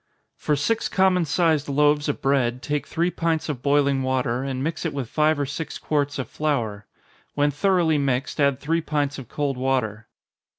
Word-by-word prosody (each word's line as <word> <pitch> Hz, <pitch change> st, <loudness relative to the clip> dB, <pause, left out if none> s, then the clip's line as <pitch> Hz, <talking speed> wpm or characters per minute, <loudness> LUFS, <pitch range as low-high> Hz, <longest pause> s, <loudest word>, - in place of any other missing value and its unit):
_ -, -, -49 dB, 0.3 s
For 150 Hz, -, 0 dB
six 220 Hz, +11 st, 0 dB
common 185 Hz, -2 st, +3 dB
sized 155 Hz, -2 st, +1 dB
loaves 145 Hz, +1 st, +2 dB
of 145 Hz, -, -3 dB
bread, 125 Hz, -2 st, +1 dB
take 145 Hz, +2 st, -2 dB
three 170 Hz, +2 st, 0 dB
pints 165 Hz, -2 st, -1 dB
of 135 Hz, -5 st, -3 dB
boiling 140 Hz, -1 st, +2 dB
water, 130 Hz, -1 st, 0 dB
and 135 Hz, -1 st, -3 dB
mix 160 Hz, +3 st, -3 dB
it 165 Hz, -4 st, -3 dB
with 135 Hz, -4 st, -3 dB
five 155 Hz, +3 st, +2 dB
or 145 Hz, -, 0 dB
six 145 Hz, +4 st, -5 dB
quarts 145 Hz, -2 st, -1 dB
of 130 Hz, -4 st, -3 dB
flour. 115 Hz, -10 st, -2 dB, 0.5 s
When 145 Hz, 0 st, +2 dB
thoroughly 165 Hz, 0 st, +2 dB
mixed, 135 Hz, 0 st, -1 dB
add 140 Hz, -2 st, +2 dB
three 165 Hz, +3 st, 0 dB
pints 145 Hz, -3 st, -1 dB
of 125 Hz, -, -10 dB
cold 140 Hz, -3 st, -2 dB
water. 120 Hz, -4 st, -1 dB
145 Hz, 185 wpm, -24 LUFS, 135-155 Hz, 0.5 s, common